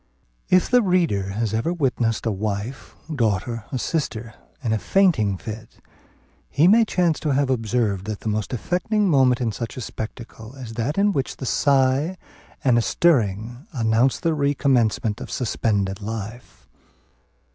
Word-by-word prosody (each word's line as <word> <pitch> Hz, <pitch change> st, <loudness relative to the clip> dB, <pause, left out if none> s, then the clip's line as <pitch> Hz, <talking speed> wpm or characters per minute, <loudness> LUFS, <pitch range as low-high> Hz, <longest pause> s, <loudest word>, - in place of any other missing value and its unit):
If 185 Hz, -1 st, +4 dB
the 250 Hz, -1 st, +4 dB
reader 170 Hz, -, +1 dB
has 110 Hz, 0 st, -1 dB
ever 115 Hz, +9 st, 0 dB
witnessed 125 Hz, -9 st, 0 dB
a 115 Hz, -, +1 dB
wife, 105 Hz, +5 st, -4 dB, 0.2 s
daughter, 115 Hz, -1 st, -1 dB
or 130 Hz, -, -1 dB
sister, 120 Hz, -5 st, -3 dB, 0.3 s
in 115 Hz, -3 st, 0 dB
a 110 Hz, -, 0 dB
fainting 125 Hz, -, +2 dB
fit, 110 Hz, +3 st, -9 dB, 0.7 s
he 150 Hz, +5 st, +3 dB
may 225 Hz, +4 st, +6 dB
chance 175 Hz, -6 st, +1 dB
to 155 Hz, -, -2 dB
have 135 Hz, 0 st, +1 dB
observed 110 Hz, -5 st, 0 dB
that 110 Hz, -2 st, -4 dB
the -, -, -6 dB
most 105 Hz, 0 st, -1 dB
affecting 190 Hz, -, 0 dB
moment 130 Hz, -6 st, +3 dB
in 115 Hz, -2 st, 0 dB
such 115 Hz, +3 st, -6 dB
a -, -, -4 dB
spectacle, 110 Hz, +1 st, -8 dB
is 125 Hz, -4 st, -8 dB
that 120 Hz, -, -2 dB
in 205 Hz, +1 st, +3 dB
which 135 Hz, -8 st, -2 dB
a 130 Hz, -, -6 dB
sigh 140 Hz, +6 st, +2 dB, 0.5 s
and 125 Hz, -4 st, +4 dB
a -, -, +2 dB
stirring 120 Hz, -, +1 dB
announce 115 Hz, +1 st, +2 dB
the 165 Hz, -2 st, +1 dB
recommencement 130 Hz, -7 st, +1 dB
of -, -, -7 dB
suspended 105 Hz, -5 st, -1 dB
life. 110 Hz, +3 st, -7 dB
120 Hz, 155 wpm, -23 LUFS, 110-145 Hz, 0.7 s, may